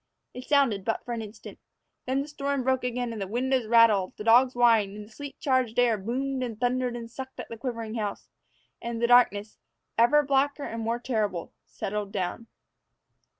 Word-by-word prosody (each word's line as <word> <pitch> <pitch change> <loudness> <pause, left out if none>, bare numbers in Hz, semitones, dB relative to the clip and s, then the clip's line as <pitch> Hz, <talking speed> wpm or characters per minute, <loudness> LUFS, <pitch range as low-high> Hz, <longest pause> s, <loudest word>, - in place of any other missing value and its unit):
It 250 +1 -8
sounded 265 -9 +2
but 225 - -2
for 240 - -4
an 230 - -3
instant. 215 0 -10 0.5
Then 265 +2 +1
the - - -10
storm 280 -2 -2
broke 260 0 +1
again, 245 -1 -2
the 195 - -3
windows 250 +2 0
rattled, 220 -5 +4
the - - -6
dogs 245 +3 +5
whined, 215 -4 +3
the 215 - -19
sleet 285 +5 -9
charged 255 -4 +1
air 245 -2 +4
boomed 255 +6 -3
and 230 -4 -4
thundered 250 0 0
and 235 -1 -6
sucked 260 +3 -9
at - - -7
the 230 - -6
quivering 230 -2 -4
house, 215 -3 -4 0.5
and 235 -1 -4
darkness, 235 -3 +3 0.4
ever 295 +6 +5
blacker 280 +1 +1
and 230 -3 -5
more 230 +1 -1
terrible, 215 -8 -2
settled 205 0 -4
down. 200 +3 -3
235 Hz, 175 wpm, -27 LUFS, 220-260 Hz, 0.5 s, dogs